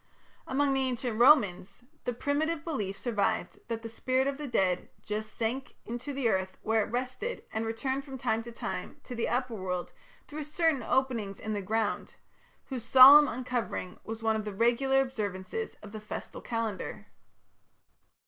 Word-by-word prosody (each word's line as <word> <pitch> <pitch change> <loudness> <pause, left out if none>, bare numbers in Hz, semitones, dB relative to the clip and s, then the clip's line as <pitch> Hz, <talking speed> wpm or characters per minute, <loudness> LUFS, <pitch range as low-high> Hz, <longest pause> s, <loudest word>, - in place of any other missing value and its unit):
Among 275 +1 +2
the 270 - +1
ancient 245 -3 -2
Romans 220 -6 +4 0.2
the 245 - +1
primitive 295 +5 -1
belief 210 - -3
survived 210 -5 -1
that 230 -1 -4
the - - -4
spirit 255 +3 0
of 280 +1 -2
the 295 - -4
dead 185 -7 +1
"just 215 +1 -4
sank 235 +5 -3
into 240 +5 -5
the 270 -3 0
earth 190 -3 0
where 220 0 +2
it - - -6
rested, 255 - -3
and 220 +1 -1
returned 260 +5 -2
from 270 -1 -8
time 225 -3 0
to 235 +1 -9
time 230 - -5
to 250 - -8
the 235 -1 -1
upper 250 0 0
world 185 -3 -3 0.3
through 300 0 -5
certain 310 -2 +1
openings 230 -5 0
in 215 0 -3
the 205 - -2
ground 215 +2 0
(mundi), - - -17 0.6
whose 255 -4 -4
solemn 270 +5 +10
uncovering 245 -7 -3
was 225 0 -6
one 220 0 +2
of 215 - -2
the 210 -2 -5
regular 255 +5 +3
observances 220 - -3
of 210 - -9
the 215 0 -7
festal 215 - -7
calendar". 220 -2 -3
235 Hz, 170 wpm, -30 LUFS, 215-265 Hz, 0.6 s, solemn